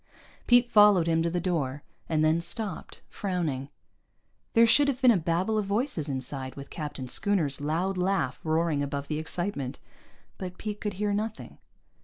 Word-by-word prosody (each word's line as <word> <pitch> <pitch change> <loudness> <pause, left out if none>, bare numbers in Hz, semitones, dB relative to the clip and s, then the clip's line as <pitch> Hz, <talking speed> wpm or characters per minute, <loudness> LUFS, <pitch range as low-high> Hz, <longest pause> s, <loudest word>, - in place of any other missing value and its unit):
Pete 245 0 +6
followed 205 -5 +6
him 165 -1 +2
to 170 - +1
the 175 +1 -1
door, 145 -6 -2 0.3
and 155 -1 +2
then 160 +2 +3
stopped, 195 +2 -5
frowning. 160 -9 -3 0.8
There 230 0 +7
should 285 +6 +5
have 265 -3 0
been 255 -2 +6
a - - +4
babble 180 +5 0
of 205 - -2
voices 200 - -1
inside, 130 0 -4
with 140 0 -10
Captain 145 -4 -5
Schooner's 155 -3 0
loud 170 +6 -1
laugh 180 -8 0
roaring 160 -2 +1
above 140 0 -3
the 155 -1 -1
excitement. 155 -4 -3 0.6
But 180 -1 -6
Pete 210 -1 -5
could 210 -2 -2
hear 205 +2 -1
nothing. 215 +1 -4
170 Hz, 165 wpm, -28 LUFS, 150-205 Hz, 0.8 s, There